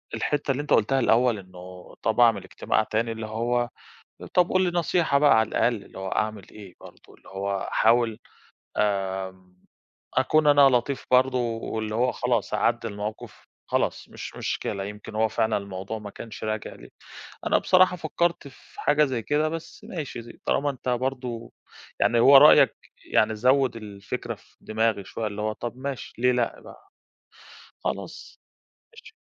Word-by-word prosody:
الحتّة 145 Hz, -1 st, -1 dB
اللي 135 Hz, +2 st, -1 dB
أنت 150 Hz, -, -1 dB
قُلتها 135 Hz, +5 st, +3 dB
الأول 120 Hz, -1 st, +3 dB
إنه 90 Hz, -1 st, -12 dB
طَب 110 Hz, +1 st, 0 dB
أعمل 115 Hz, -5 st, +5 dB
اجتماع 95 Hz, -, -1 dB
تاني 115 Hz, +1 st, -1 dB
اللي 110 Hz, -1 st, -5 dB
هو 120 Hz, +2 st, -1 dB, 0.7 s
"طَب 180 Hz, -1 st, +4 dB
قُل 185 Hz, 0 st, +3 dB
لي 180 Hz, -, +1 dB
نصيحة 165 Hz, -4 st, +2 dB
بقى 145 Hz, -3 st, +5 dB
على 110 Hz, -, +2 dB
الأقل، 115 Hz, -5 st, 0 dB
اللي -, -, -13 dB
هو 95 Hz, 0 st, -4 dB
أعمل 110 Hz, -1 st, -2 dB
إيه 100 Hz, -4 st, -12 dB
برضو؟" -, -, -16 dB
اللي -, -, -20 dB
هو 100 Hz, 0 st, -3 dB
أحاول 115 Hz, -1 st, +2 dB, 0.6 s
آمم 95 Hz, -2 st, -2 dB, 0.6 s
أكون 150 Hz, +3 st, +3 dB
أنا 145 Hz, -1 st, +6 dB
لطيف 130 Hz, +2 st, 0 dB
برضو، 130 Hz, 0 st, +4 dB, 0.2 s
واللي 110 Hz, -1 st, -4 dB
هو 125 Hz, +2 st, +2 dB
خلاص 120 Hz, -5 st, -1 dB
أعَدّي 115 Hz, +2 st, +1 dB
المَوقِف، 105 Hz, +1 st, -7 dB, 0.2 s
خلاص -, -, -1 dB
مش -, -, -8 dB
مشكلة، 100 Hz, -1 st, -3 dB
يمكن 105 Hz, +1 st, -9 dB
هو 110 Hz, +1 st, +3 dB
فعلًا 110 Hz, 0 st, 0 dB
الموضوع 100 Hz, +2 st, -6 dB
ما 105 Hz, -1 st, -8 dB
كانش 110 Hz, +1 st, -9 dB
راجع 110 Hz, 0 st, -3 dB
لي. -, -, -14 dB, 0.6 s
أنا -, -, +4 dB
بصراحة 185 Hz, -1 st, +4 dB
فكّرت 170 Hz, -1 st, -1 dB
في 135 Hz, -, -14 dB
حاجة 150 Hz, +1 st, +3 dB
زي 125 Hz, -4 st, -2 dB
كده، 150 Hz, +5 st, 0 dB
بس 165 Hz, 0 st, -8 dB
ماشي 150 Hz, -9 st, -6 dB
ز 115 Hz, -, -11 dB
طالما 145 Hz, +1 st, +1 dB
أنت 130 Hz, -1 st, -5 dB
برضو 125 Hz, -2 st, -3 dB, 0.5 s
يعني 120 Hz, 0 st, +3 dB
هو 135 Hz, +3 st, +8 dB
رأيَّك 150 Hz, +2 st, +7 dB, 0.4 s
يعني 110 Hz, 0 st, +3 dB
زوّد 130 Hz, +3 st, +2 dB
الفكرة 100 Hz, -3 st, -6 dB
في -, -, -26 dB
دماغي 110 Hz, -2 st, 0 dB
شوية، 110 Hz, +3 st, -4 dB
اللي 105 Hz, 0 st, -5 dB
هو 110 Hz, 0 st, -1 dB
طَب 120 Hz, +3 st, -6 dB
ماشي، 135 Hz, 0 st, -6 dB
ليه 125 Hz, +1 st, +3 dB
لأ 120 Hz, -1 st, -1 dB
بقى؟ 395 Hz, -, -15 dB, 1.0 s
خلاص. -, -, -5 dB, 0.6 s
ماشي. -, -, -14 dB
115 Hz, 160 wpm, -25 LUFS, 105-135 Hz, 1.0 s, هو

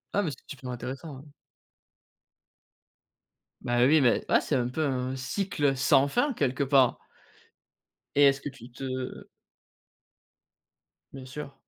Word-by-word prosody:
Ah 205 Hz, -, +3 dB
mais 175 Hz, -, -1 dB
c'est 145 Hz, -, -7 dB
super 130 Hz, -2 st, -8 dB
intéressant, 130 Hz, +4 st, -6 dB
hein. 140 Hz, +2 st, -15 dB, 2.3 s
Bah 120 Hz, 0 st, +2 dB
oui 150 Hz, +3 st, +5 dB
mais 120 Hz, -3 st, +2 dB
ouais -, -, +4 dB
c'est -, -, -1 dB
un 120 Hz, -1 st, +1 dB
peu 155 Hz, +5 st, -2 dB
un 130 Hz, -1 st, -2 dB
cycle 145 Hz, 0 st, -1 dB
sans 135 Hz, +2 st, +4 dB
fin, 255 Hz, -, +1 dB
quelque 140 Hz, -, 0 dB
part. 135 Hz, -2 st, +3 dB, 1.2 s
Et 145 Hz, -, +5 dB
est-ce 135 Hz, -1 st, +4 dB
que 145 Hz, -, -4 dB
tu 125 Hz, -3 st, -14 dB
te 130 Hz, 0 st, -5 dB, 1.9 s
Bien 135 Hz, -1 st, -9 dB
sur. 140 Hz, +2 st, -8 dB
135 Hz, 135 wpm, -28 LUFS, 130-145 Hz, 2.3 s, oui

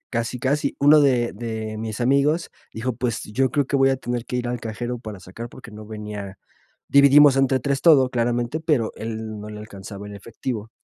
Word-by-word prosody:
Casi, 115 Hz, +1 st, -2 dB
casi, 140 Hz, +3 st, 0 dB
uno 150 Hz, +2 st, +7 dB
de 125 Hz, -5 st, +2 dB
de 110 Hz, 0 st, -5 dB
mis 110 Hz, +1 st, -4 dB
amigos 140 Hz, +6 st, +2 dB, 0.2 s
dijo: 115 Hz, +3 st, -2 dB
"Pues 120 Hz, 0 st, -2 dB
yo 130 Hz, +4 st, +1 dB
creo 145 Hz, -2 st, +1 dB
que 140 Hz, -, 0 dB
voy 135 Hz, 0 st, +4 dB
a -, -, +1 dB
tener 120 Hz, -2 st, -4 dB
que -, -, -5 dB
ir 125 Hz, -1 st, -1 dB
al 120 Hz, 0 st, -3 dB
cajero 120 Hz, +2 st, -4 dB
para 105 Hz, -4 st, -8 dB
sacar", 105 Hz, +6 st, -8 dB
porque 120 Hz, -1 st, -13 dB
no 105 Hz, 0 st, -10 dB
venía 105 Hz, -2 st, -7 dB, 0.5 s
dividimos 140 Hz, 0 st, +7 dB
entre 135 Hz, -1 st, +2 dB
3 140 Hz, +1 st, 0 dB
todo, 140 Hz, -6 st, +6 dB
claramente, 120 Hz, +3 st, -1 dB
pero 150 Hz, -9 st, 0 dB
él 110 Hz, -1 st, -5 dB
no 105 Hz, -, -8 dB
le 105 Hz, 0 st, -8 dB
alcanzaba 100 Hz, -1 st, -9 dB
en 105 Hz, -, -9 dB
efectivo. 115 Hz, +1 st, -6 dB
120 Hz, 200 wpm, -23 LUFS, 110-135 Hz, 0.5 s, uno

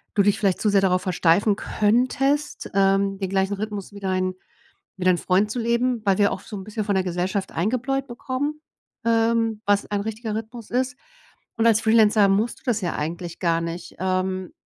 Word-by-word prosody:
du 200 Hz, -, +4 dB
dich 205 Hz, 0 st, +2 dB
vielleicht 195 Hz, -3 st, +1 dB
zu 215 Hz, -, +2 dB
sehr 200 Hz, -1 st, +4 dB
darauf 185 Hz, -1 st, +2 dB
versteifen 185 Hz, +3 st, +3 dB
könntest, 255 Hz, +8 st, 0 dB
ähm, 195 Hz, 0 st, +2 dB
den 190 Hz, -, -2 dB
gleichen 190 Hz, +1 st, +1 dB
Rhythmus 205 Hz, -1 st, -5 dB
wie 200 Hz, -, -9 dB
dein 185 Hz, -1 st, -1 dB, 0.7 s
wie 180 Hz, -, -3 dB
dein 185 Hz, -1 st, +4 dB
Freund 195 Hz, +3 st, +1 dB
zu 245 Hz, -, -3 dB
leben, 235 Hz, +1 st, +1 dB
weil 195 Hz, -2 st, +3 dB
wir 200 Hz, -, +4 dB
auch -, -, -3 dB
so 210 Hz, -, -9 dB
'n 190 Hz, -, -7 dB
bisschen 215 Hz, +1 st, -4 dB
von 200 Hz, -2 st, 0 dB
der 190 Hz, -, +2 dB
Gesellschaft 185 Hz, +2 st, -2 dB
eingebläut 255 Hz, +8 st, -1 dB
bekommen, 275 Hz, +5 st, -4 dB, 0.4 s
ähm, 225 Hz, -1 st, +2 dB
was 205 Hz, 0 st, +2 dB
ein 205 Hz, -1 st, -1 dB
richtiger 220 Hz, +1 st, -4 dB
Rhythmus 225 Hz, +1 st, -7 dB
ist. 255 Hz, +1 st, -1 dB, 0.6 s
Und 230 Hz, 0 st, +2 dB
als 225 Hz, -1 st, +4 dB
Freelancer 220 Hz, -2 st, +5 dB
musst 210 Hz, +5 st, 0 dB
du -, -, -31 dB
das 225 Hz, -5 st, 0 dB
ja 175 Hz, -, -2 dB
eigentlich 170 Hz, +3 st, -4 dB
gar 165 Hz, -1 st, +1 dB
nicht. 170 Hz, +1 st, -6 dB
Ähm, 185 Hz, 0 st, -1 dB
205 Hz, 190 wpm, -23 LUFS, 190-230 Hz, 0.7 s, Freelancer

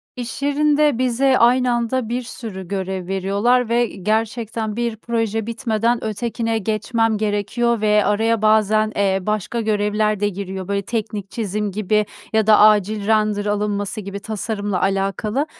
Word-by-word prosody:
İş 245 Hz, +1 st, -6 dB
yerinde 295 Hz, -1 st, +2 dB
bize 255 Hz, +1 st, +2 dB
aynı 250 Hz, +1 st, +4 dB
anda 240 Hz, 0 st, -1 dB
bir 245 Hz, +2 st, -1 dB
sürü 220 Hz, -6 st, -8 dB
görev 190 Hz, -1 st, -4 dB
veriyorlar 200 Hz, +6 st, +1 dB
ve, 240 Hz, +1 st, +2 dB
iii, 190 Hz, -, -11 dB
gerçekten 220 Hz, 0 st, -1 dB
bir 235 Hz, -1 st, -2 dB
proje 225 Hz, -1 st, -2 dB
bitmeden 230 Hz, 0 st, 0 dB
ötekine 225 Hz, +1 st, -2 dB
geçmem 220 Hz, +1 st, 0 dB
gerekiyor 215 Hz, +2 st, 0 dB
ve 210 Hz, -1 st, +3 dB
araya 225 Hz, +1 st, +1 dB
bazen, 215 Hz, 0 st, +3 dB
eee, 195 Hz, -1 st, +1 dB
başka 215 Hz, +3 st, -2 dB
görevler 210 Hz, -1 st, 0 dB
de 205 Hz, -, +1 dB
giriyor, 190 Hz, -1 st, -6 dB
böyle, 200 Hz, 0 st, -1 dB
teknik 210 Hz, -2 st, -4 dB
çizim 210 Hz, -1 st, -3 dB
gibi 210 Hz, +1 st, +1 dB, 0.3 s
ya 220 Hz, -1 st, +2 dB
da 215 Hz, -1 st, +6 dB
acil 210 Hz, -1 st, +4 dB
render 215 Hz, -2 st, +1 dB
alınması 205 Hz, 0 st, -2 dB
gibi 200 Hz, 0 st, -6 dB
tasarımla 205 Hz, -2 st, -3 dB
alakalı, 195 Hz, +7 st, 0 dB
215 Hz, 145 wpm, -20 LUFS, 205-230 Hz, 0.3 s, da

